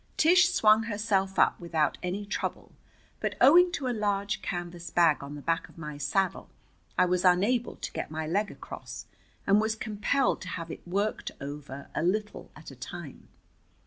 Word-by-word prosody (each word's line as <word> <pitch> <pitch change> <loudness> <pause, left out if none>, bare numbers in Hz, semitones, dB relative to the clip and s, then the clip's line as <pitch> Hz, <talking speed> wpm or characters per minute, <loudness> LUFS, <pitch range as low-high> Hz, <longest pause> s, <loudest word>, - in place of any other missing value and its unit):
Tish 350 +2 +6
swung 220 - +4
herself 205 -3 0
up - - +4
without 165 -3 0
any 185 +3 -3
trouble, 210 - -4 0.5
but - - -2
owing 350 +7 +7
to 275 -5 -2
a 250 - 0
large 205 -2 -1
canvas 175 -1 -5
bag 165 -4 +3
on 140 +1 -7
the 145 - -9
back 165 0 -1
of - - -19
my 150 -2 -7
saddle 185 +6 0 0.5
I - - +5
was 180 +1 +1
unable 205 +7 +3
to - - -6
get - - -4
my 160 0 -4
leg 200 +6 0
across, - - -9 0.4
and 200 +2 +4
was 220 0 0
compelled 220 +5 0
to 185 - -7
have 165 -2 -5
it - - -10
worked 200 +4 -1
over, 140 -1 -8
a - - -1
little 210 +5 -1
at 155 -1 -11
a - - -11
time. 145 +3 -9
190 Hz, 175 wpm, -28 LUFS, 165-215 Hz, 0.5 s, owing